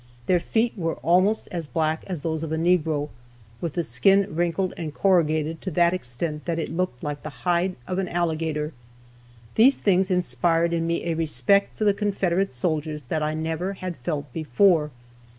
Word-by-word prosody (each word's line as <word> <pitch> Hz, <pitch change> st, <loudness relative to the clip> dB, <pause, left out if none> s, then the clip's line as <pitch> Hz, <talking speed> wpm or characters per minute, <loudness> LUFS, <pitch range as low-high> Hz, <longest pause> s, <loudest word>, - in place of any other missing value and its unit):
Their 180 Hz, -1 st, +3 dB
feet 225 Hz, +7 st, 0 dB
were 165 Hz, -5 st, -2 dB
almost 185 Hz, +6 st, +3 dB
as 170 Hz, -4 st, -4 dB
black 160 Hz, 0 st, -1 dB
as 180 Hz, -6 st, -4 dB
those 160 Hz, 0 st, -2 dB
of 160 Hz, -1 st, -4 dB
a 160 Hz, -, 0 dB
negro, 160 Hz, -3 st, +1 dB, 0.5 s
with 165 Hz, -4 st, -3 dB
the 170 Hz, -, -1 dB
skin 195 Hz, +11 st, +3 dB
wrinkled 175 Hz, +2 st, 0 dB
and 160 Hz, -3 st, -5 dB
corrugated 160 Hz, -4 st, +2 dB
to 190 Hz, -, -3 dB
that 170 Hz, +1 st, +3 dB
extent 150 Hz, 0 st, -4 dB
that 170 Hz, -1 st, -1 dB
it 165 Hz, -, -3 dB
looked 170 Hz, -8 st, -2 dB
like 145 Hz, -1 st, -4 dB
the 155 Hz, -, -6 dB, 0.2 s
hide 175 Hz, +1 st, +1 dB
of 185 Hz, +7 st, -2 dB
an 190 Hz, -, -2 dB
alligator. 160 Hz, -3 st, -1 dB, 0.8 s
These 260 Hz, +5 st, +5 dB
things 190 Hz, -1 st, +2 dB
inspired 170 Hz, 0 st, +1 dB
in 165 Hz, 0 st, 0 dB
me 170 Hz, 0 st, -1 dB
a 170 Hz, -, 0 dB
respect 160 Hz, +4 st, +1 dB
for -, -, -1 dB
the 205 Hz, -1 st, +4 dB
Confederate 195 Hz, -2 st, 0 dB
soldiers 150 Hz, +3 st, -2 dB
that 155 Hz, -, 0 dB
I 155 Hz, +1 st, -1 dB
never 160 Hz, +4 st, -2 dB
had 185 Hz, -2 st, -5 dB
felt 145 Hz, 0 st, -4 dB
before. 155 Hz, +2 st, +3 dB
165 Hz, 180 wpm, -24 LUFS, 155-185 Hz, 0.8 s, These